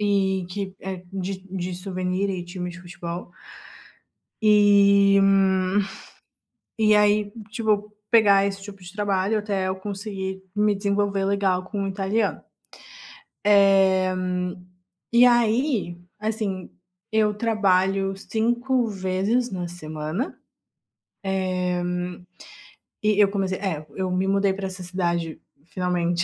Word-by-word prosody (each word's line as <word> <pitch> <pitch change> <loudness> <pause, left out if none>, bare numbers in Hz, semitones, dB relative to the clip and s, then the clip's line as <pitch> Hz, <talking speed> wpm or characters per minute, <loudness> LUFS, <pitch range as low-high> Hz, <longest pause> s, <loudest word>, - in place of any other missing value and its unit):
e 190 -3 +1
que 190 0 -4
é 190 -1 -6
de 195 0 -3
de 185 -1 -3
souvenir 185 +1 -2
e 185 -2 -3
time 180 0 -5
de 180 - -11
futebol. 175 -1 -7 1.1
E 200 -1 +6 1.6
e 215 -1 +5
aí, 210 0 +3 0.2
tipo, 210 -2 0 0.2
pegar 200 -4 +5
esse 195 0 -4
tipo 195 -1 -10
de 180 0 -10
trabalho 205 0 0
até 200 -3 -1
eu 190 - -2
conseguir 190 -1 -5
me 210 0 +2
desenvolver 200 0 0
legal 195 -2 +1
com 200 0 -3
o - - -2
italiano. 200 +3 -1 1.0
Eh, 195 -2 +5 1.0
e 235 +1 +7
aí, 235 - +2 0.2
assim, 210 -3 -3 0.4
eu 215 -1 +3
trabalho 195 -3 +1
5 240 +5 0
vezes 195 +5 0
na 180 -2 -3
semana. 155 - -5 2.7
Eh, 210 - +3
e - - 0
eu 205 - +6
comecei 195 -2 -2
é, 165 -7 -3
eu 185 -1 -2
me 185 +1 0
mudei 195 0 +2
pra 195 0 -4
essa 185 -1 -8
cidade 175 -3 -2 0.3
finalmente 175 -1 -1
195 Hz, 115 wpm, -24 LUFS, 185-210 Hz, 2.7 s, e